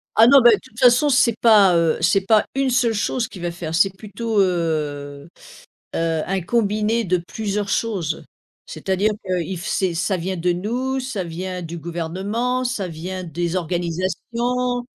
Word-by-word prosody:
Ah 225 +1 +7
non, 275 0 +7
ben 240 - +8
de - - +1
toute 225 - -15
façon 250 +3 +5
c'est 245 -4 +3
pas, 205 -6 +6
heu, 165 -1 +2
c'est 185 +4 +3
pas 215 +1 +4
une 270 -1 +1
seule 240 -2 +2
chose 225 +2 -1
qui 190 - -11
va 175 0 -3
faire, 170 -2 -5
c'est 195 +2 +3
plutôt, 215 +2 -3
heu 150 -5 -2 0.7
heu, 165 -1 0
un 190 0 -1
combiné 215 +3 0
de 180 -1 +1
plusieurs 205 +3 -4
choses. 195 -7 -1 0.4
C'est-à-dire 195 +3 -1
que 185 -2 -1
if 180 0 -6
c'est 185 -3 0
ça 185 +3 -1
vient 185 +2 -3
de 175 +1 +1
nous, 245 +9 -2
ça 250 -8 -4
vient 180 +2 -5
du 170 0 -6
gouvernement, 190 +10 -2
ça 240 -7 -2
vient 180 +3 -6
des 170 +2 -3
organisations 190 +9 -2
190 Hz, 170 wpm, -21 LUFS, 170-230 Hz, 0.7 s, ben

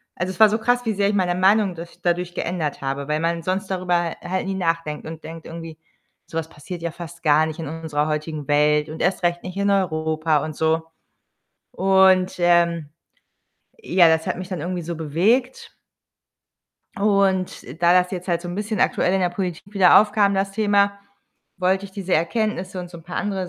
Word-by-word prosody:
also, 175 +2 -2
es 190 - -11
war 220 - +9
so 220 +2 0
krass, 245 +1 +1
wie 220 - 0
sehr 200 0 +1
ich 205 - 0
meine 180 -2 +1
Meinung 195 +1 +3
durch 170 +1 -10
dadurch 175 0 -1
geändert 165 -5 -3
habe, 135 +1 -3
weil 150 0 0
man 165 +1 -1
sonst 190 +3 -1
darüber 180 -1 0
ha 170 -1 -1
halt 185 +1 -1
nie 195 - -2
nachdenkt 165 -4 -2
und 160 0 -8
denkt 165 0 -9
irgendwie: 165 -1 -9 0.5
„Sowas 165 -1 -4
passiert 170 +3 -9
ja 170 - -2
fast 170 0 -10
gar 155 +1 +4
nicht 155 - -6
in 160 - -4
unserer 155 -1 -2
heutigen 150 -1 -4
Welt 150 +1 +2
und 155 +1 -7
erst 180 0 0
recht 175 0 +1
nicht 185 +1 -7
in 200 0 +1
Europa“ 160 -4 +1
und 155 - -6
so 160 +1 +1 0.9
und, 190 -1 +4
ähm, 170 -3 +2 0.9
ja, 185 - +4
das 160 0 +1
hat - - -2
mich 185 +1 -7
dann 180 -5 -4
irgendwie 175 +1 -3
so 170 +1 -5
bewegt 200 - 0 1.2
und 195 -2 +1 0.2
da 170 - +6
das 180 0 +3
jetzt 180 -1 -6
halt 170 -1 0
so 175 - -6
'n 175 - -5
bisschen 210 +1 -3
aktuell 180 - +2
in 195 - +1
der 180 - +1
Politik 175 -2 -4
wieder 190 -3 +7
aufkam, 205 -1 +2
das 195 0 -1
Thema, 200 -1 +2 0.6
wollte 190 +2 0
ich 195 - -16
diese 190 -2 -5
Erkenntnisse 185 +2 -1
und 175 -1 -7
so 170 - -10
'n - - -15
paar 180 +3 -7
andere 190 -3 -2
175 Hz, 200 wpm, -22 LUFS, 160-195 Hz, 1.2 s, war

